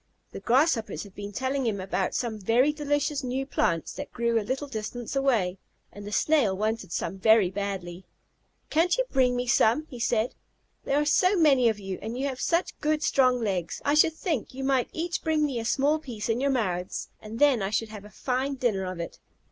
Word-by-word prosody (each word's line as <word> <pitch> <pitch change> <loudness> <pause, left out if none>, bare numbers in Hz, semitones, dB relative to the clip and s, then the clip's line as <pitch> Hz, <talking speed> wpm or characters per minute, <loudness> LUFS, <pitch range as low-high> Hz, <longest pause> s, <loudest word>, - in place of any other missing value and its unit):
The - - -7
Grasshoppers 255 -2 +1
had 200 -3 -13
been 205 +1 -7
telling 260 +3 -1
him 205 -3 -1
about 190 0 -2
some 225 -3 -2
very 240 +9 +3
delicious 290 -1 -1
new 260 +2 -2
plants 170 - 0
that 285 - -7
grew 235 -1 +1
a - - -2
little 260 +7 -3
distance 240 0 -5
away, 225 -10 +1 0.3
and 205 0 -10
the - - -6
Snail 235 -7 +2
wanted 215 -2 -2
some 190 - -3
very 220 -3 +5
badly. 190 -2 -5 0.6
"Can't 340 +5 +3
you - - +1
bring 255 -2 +3
me 245 0 -1
some?" 240 +4 +3
he 245 - -8
said. 230 0 +1 0.5
"There 280 - +2
are 295 - +1
so 365 +6 +3
many 275 -7 +5
of 220 - -1
you, 195 -2 -6
and 225 +3 -5
you 270 - -1
have 265 -2 -3
such 340 +1 0
good, 305 0 0
strong 255 -2 +3
legs. 185 -6 -2
I 290 - +3
should 310 +2 +5
think 310 - -3
you 270 - -5
might 265 -2 +1
each 345 +2 -3
bring 315 -2 +1
me 265 -5 -2
a 225 - -5
small 285 +6 +2
piece 235 -8 -6
in 230 +3 +1
your 280 - +2
mouths, 185 -9 -2
and 215 +1 -8
then 275 -4 +4
I 195 - -1
should 220 +1 -1
have 210 -2 -9
a 210 - -12
fine 260 +5 -2
dinner 225 -8 0
of 185 -1 -5
it." 170 - -6
245 Hz, 210 wpm, -27 LUFS, 210-280 Hz, 0.6 s, very